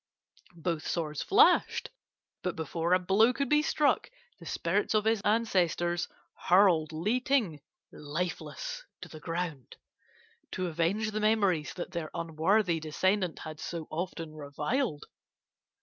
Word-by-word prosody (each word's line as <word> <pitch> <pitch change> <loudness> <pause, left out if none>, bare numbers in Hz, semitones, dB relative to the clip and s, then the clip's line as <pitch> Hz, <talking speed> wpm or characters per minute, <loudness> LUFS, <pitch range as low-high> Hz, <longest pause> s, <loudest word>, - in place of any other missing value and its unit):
"Both 165 -1 -3
swords 155 -3 -2
flashed, 415 +3 +4 0.5
but 180 - -2
before 165 +2 -1
a - - +5
blow 195 +6 +3
could 275 +1 -2
be 300 0 +5
struck 300 +5 +1 0.3
the - - -11
spirits 200 +6 0
of 215 0 +2
his 220 -2 +2
ancestors 180 -6 +1 0.4
hurled 175 -4 +5
Li 200 +11 0
Ting 240 - +1 0.3
lifeless 180 - -4 0.2
to - - -8
the 155 - -10
ground, 165 -5 -4 0.8
to 185 - -2
avenge 175 +6 0
the 215 - -2
memories 200 -7 +2
that 180 0 -5
their 170 -4 -4
unworthy 170 +3 +1
descendant 180 +4 0
had 155 0 -7
so 165 -1 -5
often 165 -1 -4
reviled. 150 - -2
180 Hz, 130 wpm, -30 LUFS, 160-215 Hz, 0.8 s, a